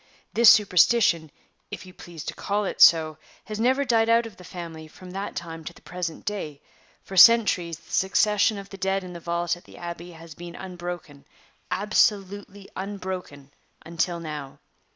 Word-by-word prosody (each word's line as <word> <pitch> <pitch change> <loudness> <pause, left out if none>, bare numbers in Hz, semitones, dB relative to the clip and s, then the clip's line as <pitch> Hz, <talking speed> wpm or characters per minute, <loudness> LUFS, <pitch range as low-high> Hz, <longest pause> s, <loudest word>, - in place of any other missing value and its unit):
This 235 -1 +7
superstition, 180 -4 +4 0.4
if - - -8
you 185 - -13
please 170 -4 -10
to - - -5
call 205 +1 -2
it - - -4
so, 160 -2 +6 0.3
has 215 0 -6
never 260 +4 +2
died 225 -2 +2
out 230 0 +4
of 225 -3 -11
the 180 - -13
family 165 -3 -8
from 180 +3 -13
that 195 +2 -5
time 165 -1 -7
to 170 - -7
the - - -19
present 175 -3 -6
day; 160 -9 -4 0.4
for 190 - -9
centuries 185 -6 +6
the - - -20
succession 210 +2 +2
of 200 0 -9
the 195 - -8
dead 195 +1 0
in 180 -1 -9
the 170 - -8
vault 170 +1 -1
at 175 - -17
the - - -15
Abbey 170 0 -8
has 165 0 -12
been 170 +2 -10
unbroken 175 -6 -8 0.5
absolutely 205 -1 0
unbroken 185 -8 -6 0.3
until 170 +1 -2
now. 150 -4 -7
180 Hz, 170 wpm, -25 LUFS, 170-205 Hz, 0.5 s, This